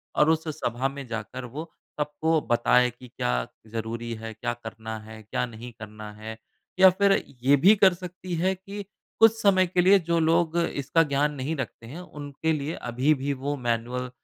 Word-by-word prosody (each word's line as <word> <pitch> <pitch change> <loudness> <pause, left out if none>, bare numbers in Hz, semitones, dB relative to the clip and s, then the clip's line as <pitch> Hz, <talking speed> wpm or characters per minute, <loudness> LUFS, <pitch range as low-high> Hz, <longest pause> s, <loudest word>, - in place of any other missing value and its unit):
और 150 - +4
उस 160 0 +1
सभा 135 -4 -1
में 140 0 -8
जाकर 115 +2 -5
वो 150 +7 -7 0.3
सबको 155 +2 +1
बताए 125 +1 +4
कि 125 +2 -14
क्या - - -1 0.2
ज़रूरी 115 +1 -4
है, 115 0 -7
क्या 110 +2 -3
करना 110 -1 -7
है, 110 0 -11
क्या 110 - -2
नहीं 120 +1 -9
करना 105 0 -8
है। 110 +1 -8 0.4
या 190 0 +10
फिर 200 +2 +3 0.3
ये 140 +2 +6
भी 210 +3 +9
कर 195 -2 +5
सकती 180 0 -6
है 185 +3 +1
कि, 200 +2 -8 0.4
कुछ 225 0 +8
समय 190 -2 +4
के 180 +1 +2
लिए 195 +2 +6
जो 170 0 +3
लोग 165 +1 +2
इसका 165 -1 +1
ज्ञान 145 0 +1
नहीं 140 +4 -2
रखते 125 -4 -6
हैं, 155 +8 -8
उनके 150 -2 -4
लिए 150 +2 -2
अभी 125 +5 +1
भी 140 0 -2
वो 140 +2 -3
मैनुअल 125 +1 -2
140 Hz, 185 wpm, -26 LUFS, 115-165 Hz, 0.4 s, या